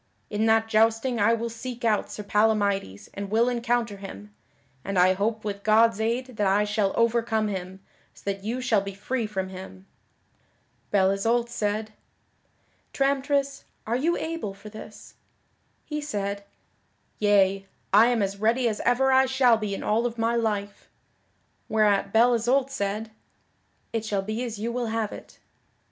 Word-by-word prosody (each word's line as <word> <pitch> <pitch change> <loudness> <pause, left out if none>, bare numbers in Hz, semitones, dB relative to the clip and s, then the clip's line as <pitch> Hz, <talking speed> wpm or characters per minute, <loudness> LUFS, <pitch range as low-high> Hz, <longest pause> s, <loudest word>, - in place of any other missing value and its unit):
In 215 +2 +1
that 225 0 +3
jousting 225 +2 +2
I 225 +3 +4
will 230 0 -4
seek 240 +1 -6
out 215 -2 +1
Sir 210 - -6
Palamydes 200 - +1
and 200 0 -5
will 225 +3 +3
encounter 235 -3 0
him, 105 - -10 0.5
and 195 -1 -3
I 180 +1 +5
hope 215 +3 -2
with 200 -1 -4
God's 220 0 +4
aid 240 +2 -2
that 205 -2 +2
I 200 +2 +3
shall 205 -1 0
overcome 230 -2 +1
him, 190 -1 -6 0.3
so - - -18
that 195 -1 -3
you 235 +4 -3
shall 225 -5 +2
be 195 -1 -7
free 230 +3 -2
from 190 -3 -3
him." 185 - -10 1.0
Belle 195 -2 +3
Isoult 230 +4 +1
said, 215 -1 -2 1.0
"Tramtris, 275 0 0 0.2
are 230 - -1
you 320 +7 +1
able 320 -12 -4
for 210 +2 -11
this?" 215 0 -11 0.7
He 300 -1 -4
said, 200 -7 -3 0.7
"Yea, 195 -2 +3 0.3
I 215 +3 +7
am 240 -4 +2
as 195 0 -3
ready 235 +4 +2
as 215 -2 -2
ever 265 +2 +3
I 265 0 +5
shall 260 -2 +4
be 210 -2 -3
in - - -6
all 225 +3 +1
of 235 0 -7
my 230 +1 +1
life." 205 -3 -2 0.8
Whereat 210 -2 +2
Belle 235 +3 +5
Isoult 255 +4 +1
said, 210 -1 -3 0.8
"It 225 -2 -1
shall 205 -3 -1
be 215 +4 -3
as 230 -3 -5
you 225 +3 -3
will 245 0 -2
have 220 -1 -2
it." - - -11
220 Hz, 160 wpm, -26 LUFS, 200-235 Hz, 1.0 s, I